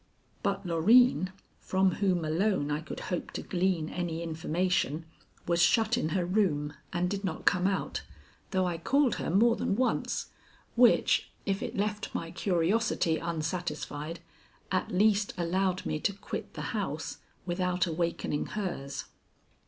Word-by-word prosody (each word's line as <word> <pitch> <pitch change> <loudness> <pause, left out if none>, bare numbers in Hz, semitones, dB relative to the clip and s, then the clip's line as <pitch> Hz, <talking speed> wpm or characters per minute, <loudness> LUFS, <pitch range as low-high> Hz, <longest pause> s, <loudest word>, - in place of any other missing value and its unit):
But - - -1
Loreen, 185 +4 +5 0.3
from 190 0 +2
whom 180 -4 +2
alone 160 -1 +1
I 150 +1 -1
could 160 - -7
hope 175 - -2
to - - -4
glean 180 -3 0
any 170 -1 -3
information, 165 -1 0 0.4
was 170 0 +2
shut 225 +5 +4
in 200 -10 0
her 175 +2 0
room, 170 -7 +1 0.2
and 175 +1 0
did 200 +2 -3
not 180 -5 -3
come 180 +1 +4
out, 195 - -1 0.5
though 185 -1 +1
I 175 -2 -2
called 275 - +2
her - - -3
more 225 +7 +4
than - - 0
once, 255 +3 0 0.4
which, 245 0 +4 0.2
if 195 -1 0
it - - -4
left 210 +1 -2
my 165 0 -3
curiosity 180 -1 +1
unsatisfied, 165 -1 -3 0.5
at 185 - 0
least 205 +2 +2
allowed 185 +2 0
me 155 - -1
to 200 - 0
quit 200 - -6
the - - -4
house - - -3 0.3
without 180 0 0
awakening 165 -3 -1
hers. 175 -10 -4
180 Hz, 145 wpm, -30 LUFS, 165-200 Hz, 0.5 s, Loreen